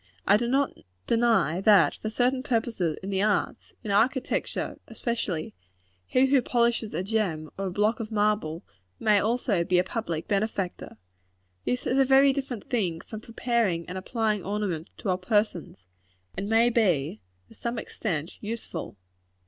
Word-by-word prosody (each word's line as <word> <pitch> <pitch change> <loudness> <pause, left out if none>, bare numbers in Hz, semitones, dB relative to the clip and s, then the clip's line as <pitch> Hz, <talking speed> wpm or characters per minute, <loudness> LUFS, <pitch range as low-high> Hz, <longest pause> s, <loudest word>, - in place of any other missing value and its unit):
I 200 - +6
do 235 +3 +1
not 270 +3 +1 0.3
deny 230 -7 +2
that, 200 -4 +6
for 215 - -4
certain 250 +3 +1
purposes 225 - -1
in 195 - -4
the 190 0 +1
arts 210 0 0
in 210 - -3
architecture, 245 +6 0
especially 185 - -3 0.5
he 255 +1 +4
who 270 0 +4
polishes 235 -2 +1
a 175 - -1
gem, 185 -8 -1
or 195 0 -3
a - - -3
block 210 +5 +1
of 225 -1 -5
marble, 210 -6 0 0.4
may 210 -2 +4
also 215 -4 +1
be 180 +1 +2
a 180 - +4
public 185 -6 -4
benefactor. 200 -3 -2 0.7
This 250 - -1
is 260 - +2
a - - +7
very 270 +1 +5
different 265 -6 -5
thing 185 -10 -1
from 220 -1 -8
preparing 230 -7 -1
and 180 - -6
applying 210 +1 -1
ornaments 195 -5 -3
to 200 - -4
our 185 0 +1
persons; 185 - -1 0.5
and 195 +2 -3
may 230 +2 +4
be, 160 - +1 0.3
to - - -15
some 235 0 -4
extent, 170 -8 -4
useful. 220 - -5
215 Hz, 155 wpm, -27 LUFS, 185-235 Hz, 0.7 s, a